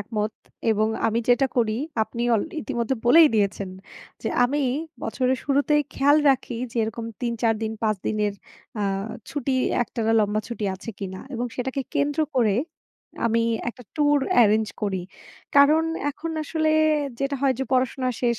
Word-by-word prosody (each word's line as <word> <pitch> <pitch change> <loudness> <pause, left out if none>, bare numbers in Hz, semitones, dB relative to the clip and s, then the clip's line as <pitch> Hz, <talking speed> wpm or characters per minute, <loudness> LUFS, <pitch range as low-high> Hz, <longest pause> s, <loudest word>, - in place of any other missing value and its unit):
একমত 210 0 -2 0.4
এবং 215 0 +2 0.2
আমি 225 +1 +1
যেটা 245 +3 +4
করি 220 -3 +2 0.3
আপনি 235 +2 -4
অল 215 - +2 0.2
ইতিমধ্যে 245 -3 -1
বলেই 315 +5 +8
দিয়েছেন। 200 -2 0 0.5
যে - - -1 0.2
আমি 285 +4 0 0.4
বছরের 255 0 0
শুরুতেই 290 +1 +2
খেয়াল 285 +2 +4
রাখি 250 -2 -1
যে 240 - -10
এরকম 225 +1 -4 0.2
৩, 240 -2 -1
৪ 225 -1 +3
দিন, 220 0 -2
৫ 215 -1 +2
দিনের 210 -1 0 0.5
আ - - 0 0.5
ছুটি 270 -1 -2 0.3
একটানা 225 -1 -1
লম্বা 210 0 +1
ছুটি 235 -3 -4
আছে 190 +4 -7
কিনা 190 -2 -6
এবং 245 +1 -2
সেটাকে 260 +2 -2
কেন্দ্র 290 +2 +1 0.2
করে 220 -5 +3 0.7
আমি 230 0 +2 0.3
একটা 250 +1 -9
ট্যুর 290 -1 +4 0.2
এরেঞ্জ 215 0 +3
করি। 190 -3 -1 0.5
কারণ 300 +3 +6 0.3
এখন 330 +3 -6
আসলে 315 +1 0 0.5
যেটা 275 +1 -1
হয় 270 -2 +3
যে 265 - -1
পড়াশোনা 255 0 +1
শেষ। 235 -2 +1
240 Hz, 155 wpm, -24 LUFS, 215-275 Hz, 0.7 s, বলেই